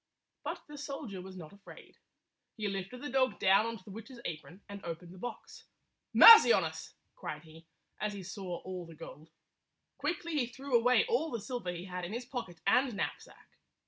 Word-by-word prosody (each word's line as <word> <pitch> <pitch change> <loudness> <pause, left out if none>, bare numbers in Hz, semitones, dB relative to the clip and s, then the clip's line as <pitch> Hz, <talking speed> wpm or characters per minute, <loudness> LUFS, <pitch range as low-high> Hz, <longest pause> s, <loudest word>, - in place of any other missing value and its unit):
But - - -5
the 295 -1 -10
soldier 275 -9 -6
was 190 0 -10
not 160 -1 -10
afraid. 200 0 -15 0.6
He 215 -1 -2
lifted 195 +6 -5
the 290 - -4
dog 260 -1 +2
down 195 +3 +4
on 230 0 -4
to 185 - -19
the 200 - -12
witch's 230 +5 -10
apron 175 +4 -7
and 200 -1 -9
opened 170 +1 -7
the 185 - -13
box. 245 - -8 0.5
"Mercy 460 0 +11
on - - +4
us!" - - -6 0.2
cried - - -6
he, 160 0 -16 0.3
as 210 0 -2
he 200 -2 -7
saw 190 -2 -6
all 185 -2 -7
the 165 - -12
gold. 155 0 -11 0.7
Quickly 335 +2 -2
he 270 -6 +1
threw 265 +2 -3
away 245 - +5
all 455 -9 0
the 235 - -3
silver 215 -4 -4
he 175 +1 -7
had 180 -1 -5
in 175 +4 -5
his 240 +2 -4
pocket 235 -10 -6
and 245 +4 +3
knapsack. 200 - -5
205 Hz, 195 wpm, -32 LUFS, 180-255 Hz, 0.7 s, Mercy